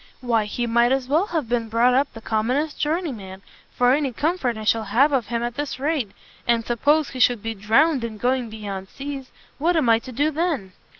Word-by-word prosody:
why 230 -4 +1
he 240 +3 -2
might 235 +1 +3
as 265 -1 0
well 320 +9 +2
have 320 - -2
been 230 -1 -1
brought 235 +3 +3
up 275 +2 +2
the 225 - -11
commonest 250 +8 -1
journeyman, 260 - -3 0.3
for 245 +1 +3
any 280 -2 0
comfort 270 -3 -1
I 215 - -6
shall 220 +1 +1
have 250 +9 +3
of 255 -6 0
him 235 0 -2
at 240 0 -2
this 290 0 -4
rate. 285 -6 0 0.4
And 230 -1 +2
suppose 290 +6 +2
he 255 - -7
should 245 -4 +3
be 225 0 -2
drowned 235 +8 +2
in 225 -2 -5
going 250 +1 0
beyond 200 -3 -6
seas? 275 -1 -7 0.3
what 335 +4 +2
am 275 -7 +2
I 225 0 +5
to 255 +2 -10
do 290 +6 +1
then?" 300 - -2
245 Hz, 215 wpm, -23 LUFS, 225-290 Hz, 0.4 s, I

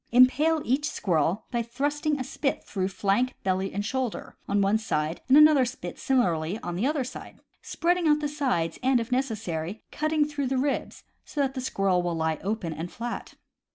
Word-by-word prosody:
Impale 290 +6 +5
each 285 +5 +1
squirrel 175 +3 0
by 240 -2 0
thrusting 285 +5 -1
a - - -1
spit 275 +2 -2
through 190 -2 -2
flank, 200 +6 0
belly, 190 0 0
and 205 +1 -3
shoulder, 255 0 -3
on 200 - +1
one 200 +2 +3
side, 155 -6 -2
and 265 - +6
another 300 -3 +7
spit 180 -8 -5
similarly 180 -9 +1
on 175 -1 -3
the 210 +9 +1
other 295 -2 0
side, 250 - -9 0.2
spreading 350 0 0
out 300 0 +4
the 300 - -1
sides, 265 - -1
and, 260 -1 +3
if 230 +2 -5
neces 250 -3 0
sary, 175 0 -5
cutting 310 0 +1
through 290 -2 -3
the 265 +1 0
ribs, 275 +2 -2 0.2
so 295 - -7
that 270 -2 +1
the 260 - -4
squirrel 195 -7 +1
will 175 -1 -2
lie 160 -1 -1
open 195 -5 -2
and 165 +3 -6
flat. 240 +1 -6
240 Hz, 190 wpm, -27 LUFS, 190-280 Hz, 0.2 s, another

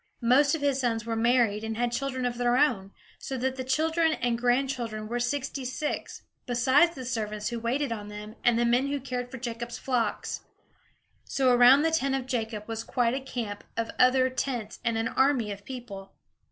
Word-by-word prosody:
Most 275 +5 +4
of 315 - -5
his 280 -2 +2
sons 230 -3 -1
were 230 -1 -2
married 225 -2 +2
and 220 0 -3
had 240 0 0
children 260 0 -2
of 240 -1 -2
their 245 0 +2
own; 230 -10 +2 0.3
so 265 - -5
that 260 +1 -1
the 260 - -4
children 320 +5 +2
and 240 -4 0
grandchildren 245 -3 -1
were 240 +2 -2
sixty 270 +2 -2
six, 260 +4 -4 0.2
besides 260 +8 +3
the 260 -2 -7
servants 215 -3 -3
who 235 -1 -4
waited 245 +4 -1
on 210 -2 -4
them, 210 +1 -8
and 240 -1 +4
the 240 - +2
men 245 +3 +2
who 285 0 -1
cared 250 -2 -4
for 265 - -7
Jacob's 235 -1 -5
flocks. 240 -5 -1 0.8
So 260 -2 +2
around 245 +4 +7
the 325 - +2
tent 275 -4 +1
of 265 -2 -3
Jacob 225 -4 -3
was 225 0 -4
quite 240 -1 +1
a 265 - -1
camp 230 -6 -5
of 230 0 -1
other 255 +1 +5
tents 245 -5 -3
and 230 -2 0
an 225 0 0
army 265 -6 +2
of 200 0 -8
people. 220 -7 -8
245 Hz, 195 wpm, -28 LUFS, 230-265 Hz, 0.8 s, around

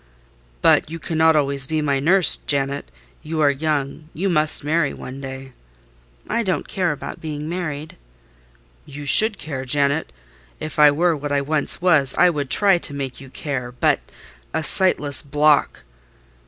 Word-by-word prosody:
"But - - +3
you 165 - -6
cannot 160 0 +1
always 140 -2 +1
be 155 +1 -1
my 140 -2 0
nurse, 180 +5 +4
Janet: 140 - -2 0.3
you 160 +1 -5
are 145 -2 +4
young—you 155 +4 -3
must 155 -3 +1
marry 160 +3 0
one 130 +2 -9
day." 135 0 -8 0.8
"I - - -1
don't 190 -5 -2
care 185 -5 -1
about 145 - -8
being 150 -1 -6
married." 155 -3 -5 0.9
"You 145 +1 -9
should 215 +8 +6
care, 135 -7 -6
Janet: 140 - 0 0.5
if 155 0 -6
I 150 0 +8
were 165 +3 +1
what 145 0 -6
I 140 -1 +1
once 150 +4 -1
was, 155 -7 +3
I 180 - +5
would 145 -4 -4
try 195 0 +4
to 145 - -3
make 135 -2 -6
you 135 - -12
care—but—a 125 +3 -4
sightless 150 -6 +3
block!" 150 +1 +1
150 Hz, 150 wpm, -20 LUFS, 140-160 Hz, 0.9 s, I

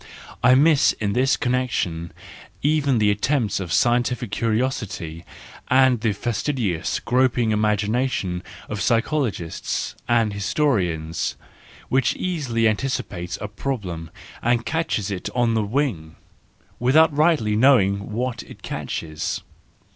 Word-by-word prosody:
I 125 +1 +7
miss 150 +1 +5
in 100 -2 -2
this 130 +3 +2
con¬ 125 - -1
nection 90 -10 -1 0.5
even 145 -3 +2
the 105 -2 +3
attempts 110 0 0
of 90 -4 -5
scientific 120 +1 +1
curiosity, 110 -8 -2 0.4
and 130 -3 +4
the 110 -2 +1
fastidious, 105 - -1
groping 125 -2 +2
imagination 105 -2 0 0.3
of 105 - -4
psycho¬ 120 +5 +1
logists 85 -5 -4
and 115 -3 +2
historians, 95 - 0 0.5
which 130 -1 +2
easily 135 -11 0
anticipates 105 -6 -2
a 105 - -3
problem 100 - -4 0.3
and 120 0 +1
catches 135 - -1
it 95 -2 -4
on 120 -2 +2
the 110 - +2
wing, 100 - -2 0.6
without 150 +5 +4
rightly 150 -9 +3
knowing 105 -5 +3
what 120 +2 -2
it - - -14
catches. 80 -1 -4
115 Hz, 115 wpm, -23 LUFS, 100-130 Hz, 0.6 s, I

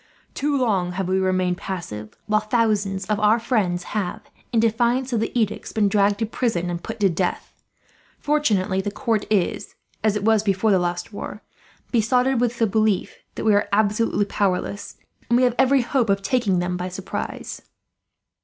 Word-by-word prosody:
Too 290 0 0
long 195 -8 +1
have 190 0 -2
we 190 +1 +1
remained 185 -1 +1
passive, 110 - -6
while 215 0 +2
thousands 210 -4 0
of 210 +1 -1
our 215 +2 +4
friends 200 -7 0
have, 200 -4 -3 0.2
in 235 - +2
defiance 240 +3 +1
of 230 - +2
the 225 - -1
edicts, 215 -2 -1
been 210 -2 +2
dragged 200 0 +2
to 225 - -1
prison 210 -6 -1
and 170 0 -4
put 225 +1 -6
to 200 - +5
death. 180 0 -2 0.6
Fortunately 215 -11 +1
the 205 - -3
court 215 +1 -1
is, 195 -5 0 0.3
as 215 -1 +2
it 210 0 -2
was 220 -1 +4
before 200 +1 +1
the 190 - +4
last 175 +3 -3
war, 210 +1 -7 0.5
besotted 250 +2 +2
with 240 -1 0
the 230 - +3
belief 215 -2 0 0.2
that - - -4
we 215 - +5
are 205 +1 +2
absolutely 210 0 +2
powerless; 200 0 -2 0.3
and 235 - +4
we 255 - +3
have 250 -1 +3
every 265 0 +4
hope 240 -2 0
of 195 0 +1
taking 205 -3 +1
them 180 0 -1
by 180 +1 -3
surprise." 185 +1 -5
210 Hz, 180 wpm, -23 LUFS, 190-230 Hz, 0.6 s, to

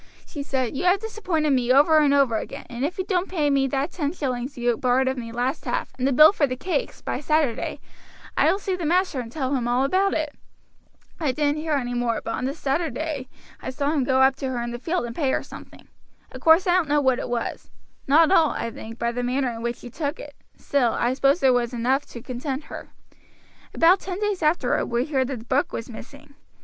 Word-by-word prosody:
"She 290 - -7
said, 265 -2 -2
'You 315 - -2
have 365 +2 +4
disappointed 370 -9 -1
me 250 -2 +2
over 295 +4 +6
and 295 -2 +3
over 275 -5 +3
again, - - -7
and 240 +2 -4
if 305 +5 -2
you 375 - -1
don't 370 -1 -1
pay 305 -6 +1
me 275 -1 +2
that 275 +5 -1
ten 295 -3 -2
shillings 260 -4 -4
you 240 -1 +1
borrowed 255 +2 +1
of 260 - 0
me 230 -3 -6
last 245 +5 -2
half, - - -2
and 255 - +1
the - - +2
bill 305 +8 +7
for 290 -7 +2
the 255 - -3
cakes, 370 - -3
by - - -3
Saturday, 300 -5 0 0.6
I - - +4
will - - 0
see 390 -2 -2
the 360 - -6
master 355 -4 +1
and 230 -2 -6
tell 265 -1 -2
him 240 -2 -1
all 245 +2 +2
about 380 +7 +1
it.' 305 -2 -2 0.9
I 300 -5 +1
didn't 295 +2 0
hear 315 -1 -2
any 245 -4 -1
more; 240 -2 0
but 230 - -5
on 250 - -3
the 275 +2 -2
Saturday 295 -2 -2 0.3
I - - -5
saw 280 +2 -1
him 295 -4 +1
go 260 0 +2
up 265 0 +4
to 270 - -3
her 245 -2 -2
in 235 - -4
the 240 - -6
field 330 +1 -1
and 235 0 -7
pay 285 -5 0
her - - 0
something. - - -13 0.4
Of - - -9
course 325 +4 +5
I 360 - +3
don't 330 -5 0
know 295 0 +3
what 260 -3 +2
it - - -5
was; 240 -1 -4 0.4
not 315 +5 +5
all, 325 -5 +5
I 230 - -3
think, 225 +1 -9
by 235 0 -1
the 245 +1 -3
manner 250 +1 0
in 230 0 -7
which 235 0 -2
she 245 - -11
took 290 +3 -3
it; 290 - -9 0.2
still, 250 -5 +1
I 240 +1 0
suppose 275 +4 +2
it 260 -1 +6
was 245 0 0
enough 260 +4 0
to 235 - -10
content 265 +3 -4
her. - - -8 0.8
About 350 +3 +4
ten 370 0 -5
days 415 -3 -1
afterward 305 -5 +1
we 240 +1 0
heard 265 -4 0
the 270 -1 -4
book 260 +5 -1
was 230 +2 -6
missing. 280 +5 -12
275 Hz, 240 wpm, -24 LUFS, 245-315 Hz, 0.9 s, bill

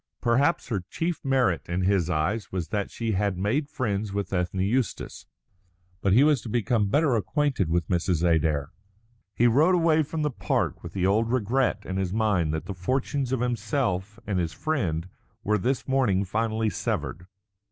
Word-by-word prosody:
Perhaps 135 +8 +2
her 100 -6 -1
chief 165 -1 -2
merit 130 -13 +1
in 90 +2 -1
his 95 -3 +2
eyes 90 +7 -1
was 90 -4 -3
that 105 -2 -2
she 115 -1 -3
had 100 -1 0
made 130 - 0
friends 105 -6 -2
with 100 0 -3
Ethne 90 +1 -1
Eustace. 115 +4 -2 0.7
But 100 - +1
he 120 +8 +6
was 150 -5 +3
to - - -7
become 110 -1 +1
better 145 +1 +3
acquainted 130 - 0
with 85 -1 0
Mrs. 85 -1 +1
Adair. 75 -3 +1 0.6
He 120 - +3
rode 150 +10 +5
away 165 -2 +3
from 155 +1 -3
the 150 - 0
park - - -1
with 85 - -9
the 95 -2 0
old 110 +4 +2
regret 125 -2 +1
in 95 - -3
his 95 -2 -1
mind 105 -8 +1
that 80 0 -3
the 100 - -4
fortunes 130 +7 -1
of 130 -2 0
himself 110 -4 -1
and 100 -3 -1
his 85 -2 -2
friend 90 - -1 0.4
were 105 +1 +1
this 130 +2 -1
morning 120 -8 +2
finally 110 +2 0
severed. 90 0 -3
105 Hz, 175 wpm, -26 LUFS, 90-130 Hz, 0.7 s, he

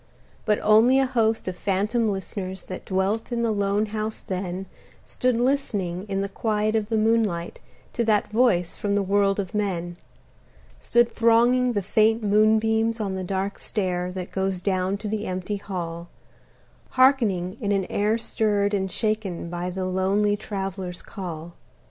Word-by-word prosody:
But 210 -1 +3
only 225 +5 +6
a 270 - +4
host 225 -5 0
of 185 - -2
phantom 210 +5 0
listeners 190 -1 -4
That 185 - -8
dwelt 195 +5 -1
in 235 -1 0
the 230 - +1
lone 200 0 +1
house 215 +1 -3
then 185 0 -4 0.4
Stood 250 -1 0
listening 210 -8 -1
in 195 0 -1
the 200 - -1
quiet 215 +1 -1
of 215 -1 0
the 225 - +1
moonlight 215 -6 0 0.3
To 235 - 0
that 210 -2 +2
voice 215 -7 +2
from 200 -1 -1
the 205 - +2
world 195 +1 +2
of 190 -3 -3
men: 175 -5 -2 0.8
Stood 240 0 +3
thronging 240 +2 +3
the 205 -3 -1
faint 220 +3 +2
moonbeams 220 +2 +3
on 200 -3 -2
the 190 0 -3
dark 195 +2 -3
stair 180 -4 -2
That 185 -1 -6
goes 190 -1 -1
down 185 +1 0
to 210 - -6
the 215 0 -2
empty 185 +3 -3
hall, 175 -3 -5 0.9
Hearkening 220 -9 +3
in 205 -2 0
an 195 -2 +1
air 210 +4 +1
stirred 210 -3 0
and 190 -2 -1
shaken 210 -6 -2
By 175 +1 -3
the 185 +1 -3
lonely 195 +3 +1
Traveler's 195 -3 -5
call. 170 -4 -7
200 Hz, 160 wpm, -24 LUFS, 185-220 Hz, 0.9 s, only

